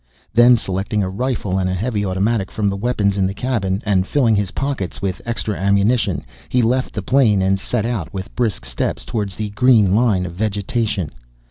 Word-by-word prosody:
Then, 120 +1 +7
selecting 100 +1 -2
a 95 - -2
rifle 105 -4 -1
and 95 -1 0
a 95 - -1
heavy 105 +1 -1
automatic 100 +2 0
from 105 -2 -1
the 100 - -2
weapons 100 -2 0
in 95 - +3
the 95 - -4
cabin, 105 -6 -1
and 95 -2 +1
filling 120 -7 +3
his 100 -2 0
pockets 135 -9 -3
with 95 -2 -3
extra 115 -3 -2
ammunition, 100 +5 +1 0.2
he 125 -1 +2
left 125 +3 0
the 105 - -3
plane 110 -6 +3
and 95 +1 +2
set 105 +2 -2
out 115 -8 -3
with 95 +2 -7
brisk 115 - -1
steps - - -3
toward 105 -3 -2
the 105 +2 -5
green 105 -3 +4
line 105 -5 +2
of 85 - -6
vegetation. 105 - -2
105 Hz, 195 wpm, -19 LUFS, 95-115 Hz, 0.2 s, Then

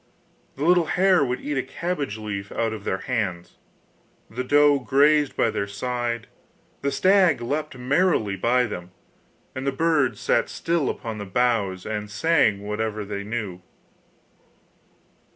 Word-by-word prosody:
The 140 - -3
little 175 -1 +4
hare 185 -2 +3
would 125 -1 -2
eat 145 -2 -2
a - - +2
cabbage 145 - -4
leaf 100 -2 -5
out 115 -1 -1
of 105 -2 -8
their 95 - -2
hands, 100 -9 -3 0.7
the 125 +3 -3
roe 145 +1 +4
grazed 145 +3 +3
by 115 - +2
their 100 - -2
side, 120 +2 -3 0.6
the 140 - 0
stag 185 -3 +4
leapt 145 +3 -3
merrily 130 - +1
by 120 +6 +2
them, 90 -7 -5 0.6
and 130 +1 -5
the - - +2
birds 145 -3 +1
sat - - +1
still 165 -5 -1
upon 110 -2 -5
the 100 - -5
boughs, 100 -3 0
and 105 -1 -4
sang 115 -3 +2
whatever 105 0 -3
they 100 0 -5
knew. 105 -4 -4
125 Hz, 145 wpm, -24 LUFS, 105-145 Hz, 0.7 s, little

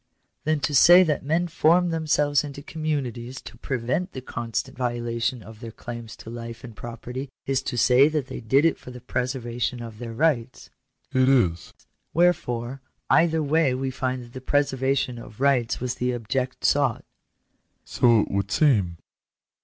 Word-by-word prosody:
" - - -49
Then 155 0 +1
to 140 +2 -1
say 175 +7 +8
that 155 -4 0
men 165 +5 +1
formed 170 +1 +3
themselves 150 -3 +2
into 140 -1 -8
communities 135 -6 -3
to - - -11
prevent 130 +9 -2
the 130 - -6
constant 115 -3 -4
violation 120 -1 -2
of 110 -1 -12
their 115 -1 -7
claims 115 0 -8
to 115 - -10
life 115 +1 -8
and 115 -3 -10
property, 125 +4 -7 0.2
is 135 -1 0
to 125 - -4
say 125 +4 +6
that 150 -3 -1
they - - -7
did 135 +7 +3
it 165 - +2
for - - -11
the 125 0 -9
preservation 125 -1 -3
of 115 -2 -8
their 120 -1 -6
rights?" 130 -2 -1 0.4
"It 130 0 +4
is." 90 -11 +2 0.2
" - - -50
Wherefore, 135 -7 +1 0.3
either 160 -1 +4
way 145 -2 +2
we 130 0 -2
find 130 -1 -3
that 120 0 -15
the 130 - -7
preservation 135 -2 0
of 110 -1 -12
rights 130 -4 +2
was 125 0 -2
the 125 0 -1
object 125 +3 -3
sought." - - +2 0.4
" - - -46 0.3
So 120 -3 +4
it - - -4
would 100 0 -1
seem." 100 - +2
130 Hz, 175 wpm, -25 LUFS, 120-145 Hz, 0.4 s, say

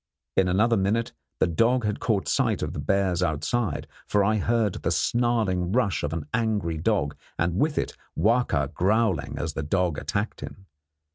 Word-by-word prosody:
In 95 - +3
another 110 +6 +3
minute 105 +4 0 0.3
the - - +4
dog 115 +8 +2
had 105 0 -1
caught 105 -5 0
sight - - +1
of - - -3
the - - -5
bears 95 +3 +1
outside, 85 +3 -1 0.2
for 105 -1 +2
I 110 +2 +2
heard 110 -1 +1
the - - 0
snarling 110 -7 +1
rush 100 - +1
of 75 - -2
an 80 -2 -3
angry 105 -8 0
dog, 80 -5 0 0.2
and 85 +2 0
with 150 0 +1
it - - -1 0.2
Wahka 105 - +2
growling 95 -4 +1
as 75 +1 -3
the - - -3
dog 85 0 0
attacked - - -3
him. 95 - -9
95 Hz, 170 wpm, -26 LUFS, 85-115 Hz, 0.3 s, the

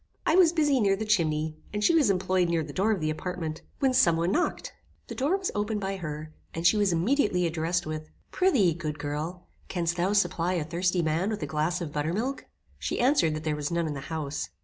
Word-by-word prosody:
I 320 - +3
was 360 -3 +6
busy 295 -5 +2
near 200 -3 +3
the 220 +3 -4
chimney, 155 -6 +1
and 210 0 -2
she 340 - +4
was 305 -9 +4
employed 185 -2 +1
near 165 -1 +1
the 145 -1 -8
door 195 +7 +1
of 200 -6 0
the 155 0 0
apartment, 160 -1 -4 0.2
when 265 -2 +2
some 170 -10 +4
one 170 +2 +1
knocked. 355 - -1 0.4
The - - -4
door 290 +9 +1
was 385 -2 -3
opened 210 +1 -1
by 195 0 -3
her, 155 -2 -6 0.2
and 165 +1 -3
she 200 - +6
was 205 -2 +2
immediately 180 - +2
addressed 170 +2 -1
with 155 0 -5 0.2
"Pry'thee, 260 - +3
good 155 -3 -4
girl, 150 +5 -4 0.2
canst 175 -1 -1
thou 185 +4 +1
supply 175 -3 +1
a 170 -4 0
thirsty 175 +2 0
man 160 +5 0
with 215 -7 -3
a - - 0
glass 155 +5 -1
of 155 -4 -5
buttermilk?" 190 - -2 0.3
She - - -2
answered 240 - +3
that 155 - -5
there 155 -1 0
was 150 -1 -3
none 170 -1 0
in 155 - -2
the 140 - -5
house. 150 -3 -3
175 Hz, 225 wpm, -27 LUFS, 155-210 Hz, 0.4 s, was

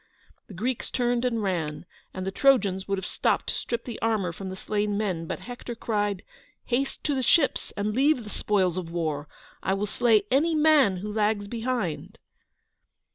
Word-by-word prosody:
The 195 - -11
Greeks 240 +7 -2
turned 245 -1 0
and 230 -3 0
ran, 170 -5 -2 0.3
and 185 0 -5
the 190 - -1
Trojans 195 -7 +3
would 195 0 0
have 190 - -4
stopped - - 0
to - - 0
strip 235 -1 -3
the 235 -3 -6
armour 215 -6 +1
from 190 +2 -6
the 185 - -5
slain 205 +1 -1
men, 185 -6 -2
but - - -4
Hector 245 0 -7
cried: 205 -4 -1 0.4
"Haste 265 +3 -1
to 295 - +1
the 265 - 0
ships 280 +3 +3
and 210 +1 -1
leave 270 +1 +3
the 210 - -9
spoils 185 -4 +1
of 170 -3 -6
war. 155 -3 -2 0.3
I 190 - +1
will 200 +1 -1
slay 220 0 +3
any 315 +5 +3
man 300 -10 +5
who 210 +3 -5
lags 210 -1 +1
behind!" 230 -6 -3
210 Hz, 185 wpm, -26 LUFS, 190-245 Hz, 0.4 s, man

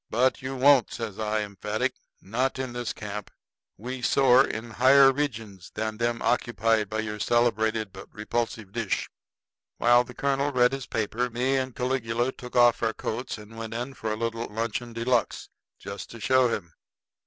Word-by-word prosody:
"But 130 +3 +2
you 130 +1 -4
won't," 135 -1 +5
says 110 -4 -5
I 110 0 0
emphatic. 105 +1 -2 0.3
"Not 125 +7 -1
in 130 -2 -4
this 120 -1 -3
camp. 105 -1 -6 0.5
We 125 +4 -6
soar 130 0 +5
in 110 +1 -5
higher 135 +4 +6
regions 115 - -4
than 110 0 -3
them 120 0 -1
occupied 115 -3 +1
by 110 0 -1
your 105 -1 -5
celebrated 110 -3 +1
but 95 - -11
repulsive 110 -1 -3
dish." 115 -2 -2 0.7
While 120 +1 +5
the 125 0 -12
colonel 140 +1 0
read 125 -2 +4
his 135 -1 -5
paper, 115 +3 -1
me 125 +3 0
and 130 -2 -2
Caligula 125 -1 -1
took 125 -1 -11
off 120 -1 +5
our 115 -1 +1
coats 120 +3 -4
and 105 +1 -12
went 115 0 -5
in 125 +3 -4
for 110 -4 -4
a - - 0
little 115 0 -2
luncheon 115 +2 -3
de 115 0 -4
luxe 120 -2 0 0.3
just 100 0 -8
to 115 - -10
show 130 +3 +4
him. 85 -8 -4
115 Hz, 175 wpm, -26 LUFS, 110-125 Hz, 0.7 s, higher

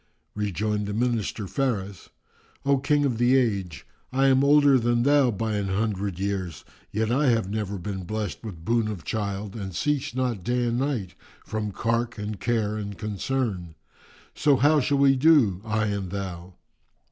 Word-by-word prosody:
Rejoined 105 +1 -1
the 105 - -3
Minister 115 -3 -1
Faris, 100 - -2 0.6
"O 140 -1 +3
King 145 +1 +2
of 120 -5 -1
the 120 +2 +4
Age, 100 -10 -1 0.3
I 135 +1 +3
am 135 +1 +4
older 145 -2 +5
than 120 0 +1
thou 140 -1 +4
by 110 0 -2
an 100 -1 -2
hundred 100 -2 -1
years 95 -4 -3 0.3
yet 110 +1 0
have 120 -4 +2
I - - -6
never 105 -2 -3
been 95 0 -5
blest 105 +4 -4
with 90 -7 -8
boon 115 0 +2
of 100 -7 -5
child 100 +2 -3
and 95 -5 -6
cease 145 -1 -1
not 125 -7 -1
day 120 +4 0
and 120 +1 0
night 130 -10 -2 0.3
from 110 -1 -3
cark 115 +2 -1
and 105 -1 -5
care 110 -2 0
and 100 -2 -5
concern; 105 -5 -3 0.6
so 145 -2 +3
how 145 +4 +4
shall 140 +1 +1
we 135 -1 +5
do, 130 - +4
I 110 -1 0
and 100 -3 -2
thou?" 95 -2 -6
110 Hz, 170 wpm, -25 LUFS, 100-125 Hz, 0.6 s, older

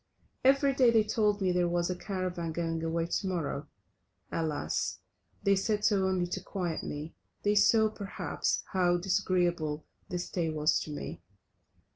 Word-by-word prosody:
Every 275 +1 +5
day 255 -2 +5
they 225 -2 +5
told 210 -1 +1
me 185 -1 +2
there 180 0 +2
was 175 +1 0
a - - -2
caravan 180 -3 -3
going 165 -1 -2
away 165 0 0
to 180 +3 -1
morrow. 155 -5 -2 0.6
Alas! 145 - -1 0.5
they 200 0 +4
said 210 +2 0
so 195 -3 +3
only 185 -2 +1
to 175 - -4
quiet 175 -5 -3
me, 150 +2 -6 0.3
they 205 - +3
saw, 220 +1 +5
perhaps, 205 -2 -2
how 175 -2 +3
disagreeable 175 -4 0 0.2
the 180 - -2
stay 175 -1 -2
was 155 0 +2
to 150 - -6
me. 145 - -6
180 Hz, 155 wpm, -30 LUFS, 165-200 Hz, 0.6 s, Every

